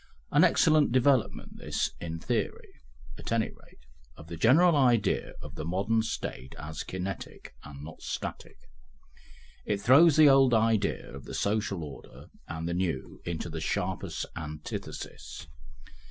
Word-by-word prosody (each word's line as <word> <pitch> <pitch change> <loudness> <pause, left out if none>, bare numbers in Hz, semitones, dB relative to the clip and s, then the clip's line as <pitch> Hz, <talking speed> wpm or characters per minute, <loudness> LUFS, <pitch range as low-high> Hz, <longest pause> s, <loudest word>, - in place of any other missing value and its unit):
An - - +5
excellent 155 -4 +4
development 130 -1 +1
this, - - -2
in 80 -1 -5
theory, - - -2 0.5
at - - -7
any 115 -1 +1
rate, - - -20 0.3
of 80 - -13
the 85 - -5
general 150 - +5
idea 120 -7 +2
of - - -9
the 80 - -6
modern 100 +7 +1
State 65 - -5
as 75 +1 -6
kinetic 95 +1 -6
and 70 0 -10
not 80 +1 -10
static; - - -6 1.1
it 105 -1 -1
throws 140 +9 +6
the 155 -1 +8
old 135 -3 +6
idea 110 -7 +1
of 70 0 -9
the - - -7
social 100 -4 -1
order 75 -2 -11 0.2
and 80 +1 -4
the 85 - -1
new 90 -2 -3
into 85 -1 -3
the 80 -1 -5
sharpest - - -2
antithesis. 75 -2 -7
100 Hz, 140 wpm, -29 LUFS, 80-120 Hz, 1.1 s, the